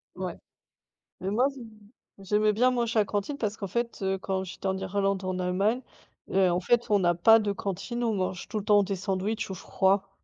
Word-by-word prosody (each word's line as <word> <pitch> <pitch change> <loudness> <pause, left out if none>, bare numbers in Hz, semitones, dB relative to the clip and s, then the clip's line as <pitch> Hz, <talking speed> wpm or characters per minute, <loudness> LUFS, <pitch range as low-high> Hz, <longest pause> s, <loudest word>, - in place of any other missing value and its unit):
Ouais, - - -5 0.8
mais 190 - -2
moi 245 +7 +3
j 270 -4 -9 0.5
j'aimais 210 +2 +2
bien 250 +5 +3
manger 235 -2 0
à - - +5
la - - -2
cantine 205 +8 -2
parce 215 -1 -2
qu'en 200 - -5
fait, 235 +4 -2
heu, 190 0 0
quand 190 0 -2
j'étais 185 +1 -7
en 190 0 -1
Irlande, 195 0 -1
en 185 0 -2
Allemagne 200 +8 +1 0.5
et 190 -1 +3
en 175 +1 +1
fait, 240 +5 +2
on 205 -2 +4
a 175 - +4
pas 225 +6 +6
de 210 - -1
cantine. 200 +5 -4
On 225 - +1
mange 185 -2 -2
tout 215 - -2
le - - -9
temps 205 -1 +5
des 195 - -2
sandwichs 200 +3 -2
ou 190 - -3
froid. 195 +2 +1
200 Hz, 215 wpm, -27 LUFS, 190-225 Hz, 0.8 s, pas